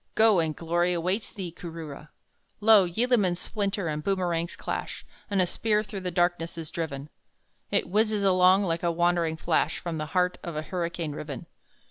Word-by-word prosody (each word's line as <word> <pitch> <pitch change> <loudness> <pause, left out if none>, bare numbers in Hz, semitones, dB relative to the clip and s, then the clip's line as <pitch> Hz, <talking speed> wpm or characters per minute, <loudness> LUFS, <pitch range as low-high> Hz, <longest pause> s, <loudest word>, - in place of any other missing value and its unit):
Go! 220 -4 +5
and 160 -2 0
glory 175 +2 +1
awaits 180 +5 -1
thee, 185 -4 -6
Kooroora! 160 -4 -8 0.5
Lo! 210 -3 +6
yeelamans 205 -2 +2
splinter 200 -1 -2
and 150 -1 -3
boomerangs 175 -3 -1
clash, - - -5 0.2
And 200 -2 +1
a - - +2
spear 210 +3 +1
through 205 -2 -6
the 185 -1 -3
darkness 175 -1 0
is 160 -2 -6
driven 150 -3 -4 0.6
It - - +1
whizzes 210 +2 +1
along 185 +1 +5
like 165 -3 -1
a 175 - +1
wandering 170 -1 +1
flash 160 0 +1
From 165 -3 -4
the 155 - -3
heart 180 0 +2
of 170 -2 -6
a 155 - -2
hurricane 170 -2 -3
riven. 145 -3 -6
175 Hz, 170 wpm, -27 LUFS, 165-195 Hz, 0.6 s, Lo